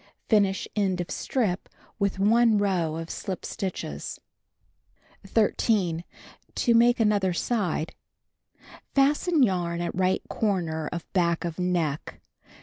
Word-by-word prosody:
Finish 200 -3 +2
end 195 -4 +1
of 175 - -4
strip 205 -8 -1 0.3
with 200 -1 0
1 220 +2 +4
row 180 -6 0
of 165 0 -5
slij) 190 -3 -5
stitches. 175 - -5 1.1
13. 195 -5 +1 0.5
To 240 - +2
make 240 +1 +5
other 205 -4 +2
side. 180 -5 -1 0.5
— - - -22
Fasten 290 +3 +3
yarn 175 -5 0
at 175 0 -2
right 185 0 +1
corner 170 -7 -1
of 170 -1 -5
back 170 -2 +1
of 170 +1 -4
neck. 170 -5 -1
190 Hz, 120 wpm, -26 LUFS, 170-215 Hz, 1.1 s, make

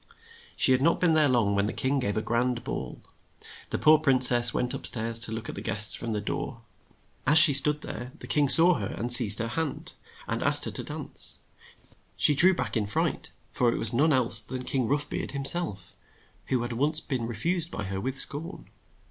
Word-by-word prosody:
She - - +4
had 130 0 -1
not 165 +4 -1
been 170 -3 -1
there 155 -2 0
long 115 -5 -2
when 100 +1 -3
the - - -7
king 135 +1 -4
gave 105 -4 -5
a 110 - -5
grand 120 +1 -4
ball. - - -9 0.7
The - - -5
poor 155 0 +2
prin 135 -4 -1
cess 120 -1 +5
went 125 0 -5
up - - -4
stairs 115 0 -3
to 115 -1 -3
look 110 0 -9
at - - -9
the 100 - -11
guests 105 +1 +1
from 115 - -3
the 105 - -5
door. 115 +2 -8 0.7
As 150 +3 +4
she 155 -2 +11
stood 150 +2 +3
there, 120 +1 -10
the - - -13
king 145 -2 -2
saw 170 +4 +7
her, 100 - -7
and 120 +4 -1
seized 110 -4 +8
her 115 - -5
hand, 160 +3 -7 0.3
and - - -6
asked - - +2
her - - -8
to - - -9
dance - - -6 0.8
She 150 - +4
drew 180 +6 +6
back 125 -7 -7
in 110 -3 -3
a - - -11
fright, 100 - -5 0.2
for 120 -2 -2
it - - -6
was 115 - +6
none 150 +7 -1
else 130 -4 +3
than 130 -1 -10
King 125 -2 -5
Rough 145 +3 -3
Beard - - -8
him 140 -1 -8
self, 155 - -1 0.5
who 125 -2 -4
had 120 0 -8
once 150 +6 -1
been 130 -7 -7
re 120 - -9
fused 170 - -2
by - - -9
her 95 0 -8
with 130 +3 -7
scorn. 160 +7 -1
125 Hz, 225 wpm, -23 LUFS, 115-150 Hz, 0.8 s, she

